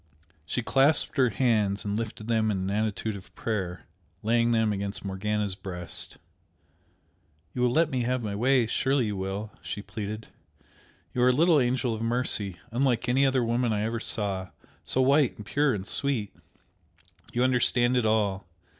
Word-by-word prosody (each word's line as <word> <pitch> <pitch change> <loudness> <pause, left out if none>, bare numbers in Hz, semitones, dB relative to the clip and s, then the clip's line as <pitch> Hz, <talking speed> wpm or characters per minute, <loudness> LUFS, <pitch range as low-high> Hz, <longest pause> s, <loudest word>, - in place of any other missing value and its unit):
She 125 - -2
clasped 140 +6 +3
her 130 -2 +4
hands 105 -4 +1
and 100 0 -1
lifted 110 -1 -4
them 110 -2 +2
in 105 - 0
an 95 +1 -2
attitude 110 0 -1
of 95 - -12
prayer, 95 -6 -3 0.4
laying 115 +2 +3
them 110 -2 +2
against 100 0 -4
Morgana's 100 +1 -1
breast. 90 -2 -3 1.4
"You 125 - -3
will 125 - +4
let 155 +4 +2
me 130 -2 0
have 125 0 -1
my 105 -2 -3
way 125 +3 +3
surely 130 +3 +1
you 105 -1 -2
will?" 95 +3 -4
she 100 - -5
pleaded 110 +1 -6 0.8
"You 125 - 0
are 125 - +6
a - - +6
little 160 +4 +4
angel 125 -2 +1
of 110 - -5
mercy, 115 -5 0
unlike 125 0 +1
any 135 +3 +3
other 130 -2 +2
woman 120 +1 +1
I 105 -1 0
ever 115 +1 -1
saw 100 -5 -2 0.3
so 130 - +1
white 140 0 +3
and 105 - -9
pure 145 +5 +2
and 100 -5 -3
sweet! 120 -4 -2 1.0
you 120 - +1
understand 125 -1 +3
it 120 -3 +2
all! 100 -4 +1
115 Hz, 170 wpm, -27 LUFS, 105-125 Hz, 1.4 s, are